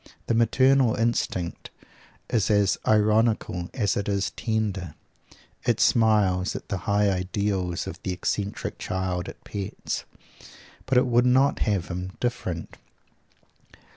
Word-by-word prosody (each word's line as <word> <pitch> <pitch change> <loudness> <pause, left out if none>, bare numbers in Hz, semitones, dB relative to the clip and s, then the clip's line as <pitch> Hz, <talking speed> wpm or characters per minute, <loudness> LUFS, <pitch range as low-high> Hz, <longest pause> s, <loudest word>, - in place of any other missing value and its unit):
The - - 0
maternal 130 +1 +4
instinct 110 -6 -1 0.6
is 115 -3 +1
as 100 -2 +3
ironical 110 -4 +2
as 105 -6 0
it 100 0 -2
is 100 -1 0
tender. 100 -8 -2 0.7
It - - +1
smiles 105 -5 +3
at - - -7
the 100 - -1
high 100 0 +3
ideals 95 -1 -1
or - - -4
the 95 - -3
eccentric 100 +3 -3
child 95 -1 -2
it - - -12
pets, 100 -2 -5 0.8
but 130 -1 +2
it 125 - +5
would 120 0 +3
not 130 +3 +3
have 100 -5 0
him 90 +1 -5
different. 90 -9 -3
100 Hz, 125 wpm, -25 LUFS, 95-115 Hz, 0.8 s, it